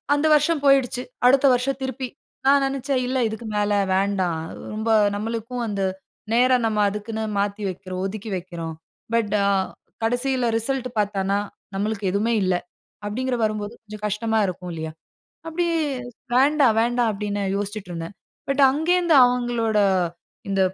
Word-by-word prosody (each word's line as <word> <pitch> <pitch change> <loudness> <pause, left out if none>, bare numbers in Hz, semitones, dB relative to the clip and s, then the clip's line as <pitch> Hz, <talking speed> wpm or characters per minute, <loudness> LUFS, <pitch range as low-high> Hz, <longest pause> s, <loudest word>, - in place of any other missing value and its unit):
அந்த 290 +2 0
வருஷம் 300 0 +2
போயிடுச்சு. 265 -2 +3 0.2
அடுத்த 270 +2 +5
வருஷம் 270 +2 -1
திருப்பி 260 0 -3 0.4
நான் 280 0 +5
நினச்சேன் 270 -1 -1
இல்ல, 260 +1 -1
இதுக்கு 220 +1 -6
மேல 205 0 +1 0.2
வேண்டாம். 190 -4 0 0.3
ரொம்ப 220 +1 -1 0.3
நம்மளுக்கும் 230 +3 -3
அந்த 200 -2 -2 0.5
நேரம் 250 0 +4
நம்ம 215 -1 -1
அதுக்குன்னு 220 +2 -4 0.2
மாத்தி 200 +1 -1
வைக்கிறோம். 185 0 -6
ஒதுக்கி 215 +2 -6
வைக்கிறோம். 170 -3 -6 0.4
பட் 215 -3 +1
ஆ - - +3 0.6
கடைசியில 250 +1 +1
ரிசல்ட் 255 +1 -1
பார்த்தான்னா 200 -1 0 0.4
நம்மளுக்கு 205 0 -2
எதுமே 225 +3 +1
இல்ல. 185 -1 +2 0.5
அப்டிங்கிற 250 +4 -1
வரும்போது 215 0 -1
கொஞ்சம் 215 -1 -10
கஷ்டமா 220 +2 -1
இருக்கும் 180 -1 -5
இல்லியா? 160 -1 -4 0.6
அப்டி 345 +2 -1 0.7
வேண்டாம், 275 -3 +4
வேண்டாம் 240 0 +2
அப்டின்னு 205 0 -3
யோசிச்சுட்ருந்தேன். 195 -4 -5 0.3
பட் 275 +1 +1
அங்கேருந்து 340 +3 +2
அவங்களோட 240 -3 0 0.7
இந்த 195 -1 0
225 Hz, 130 wpm, -23 LUFS, 200-255 Hz, 0.7 s, அடுத்த